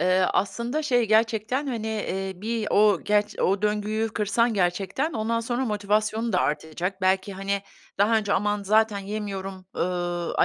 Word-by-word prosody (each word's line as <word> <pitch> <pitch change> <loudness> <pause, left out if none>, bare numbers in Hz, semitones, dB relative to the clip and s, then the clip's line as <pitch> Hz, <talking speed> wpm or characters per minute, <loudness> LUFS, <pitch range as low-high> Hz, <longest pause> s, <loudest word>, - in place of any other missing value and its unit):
Eee, 185 +1 +3
aslında 235 +9 -1
şey, 245 -5 +2
gerçekten, 225 +5 +2
hani, 230 -5 -3
eee, 195 -3 -2
bir 220 +3 -2
o, 205 -3 +4
gerç 210 0 +1
o 195 +2 +1
döngüyü 210 +1 0
kırsan 220 +2 +1
gerçekten 195 - 0
ondan 230 +1 -1
sonra 240 +3 -1
motivasyonun 215 +1 0
da 185 - +3
artacak. 160 +6 -2
Belki, 190 +1 +1
hani, 195 +1 -2 0.4
daha 210 +3 +4
önce 205 -2 0
"Aman, 205 +1 +1
zaten 215 +1 +3
yemiyorum, 195 -2 -5
ııı, 175 -1 -2
210 Hz, 150 wpm, -25 LUFS, 195-220 Hz, 0.4 s, o